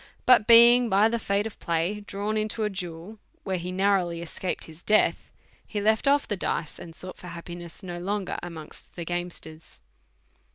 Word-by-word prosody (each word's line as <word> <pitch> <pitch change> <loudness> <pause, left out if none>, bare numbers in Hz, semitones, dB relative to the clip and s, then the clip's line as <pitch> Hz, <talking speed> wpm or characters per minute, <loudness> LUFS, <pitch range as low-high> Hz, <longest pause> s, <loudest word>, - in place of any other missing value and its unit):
But 250 -4 +6
being 235 +1 +8
by 205 +3 +4
the 235 0 -1
fate 200 -1 0
of 225 - -7
play 170 +5 -1
drawn 205 +1 -4
into 215 +1 -1
a 210 - 0
duel, 180 +3 -6 0.2
where 190 -2 -2
he 180 +2 -5
narrowly 185 -3 +1
escaped 180 +2 -4
his 160 +1 -11
death, 215 +3 +2 0.3
he 210 - -4
left 220 +2 +2
oif 280 +1 +3
the 205 - -2
dice, 160 -4 -3
and 165 -1 -10
sought 185 0 -7
for 180 - -10
happi 170 0 -8
ness 175 +3 -11
no 175 -2 -6
longer 195 +1 -3
amongst 165 -3 -10
the 170 - -5
gamesters. 175 -2 -6
190 Hz, 180 wpm, -26 LUFS, 170-215 Hz, 0.3 s, being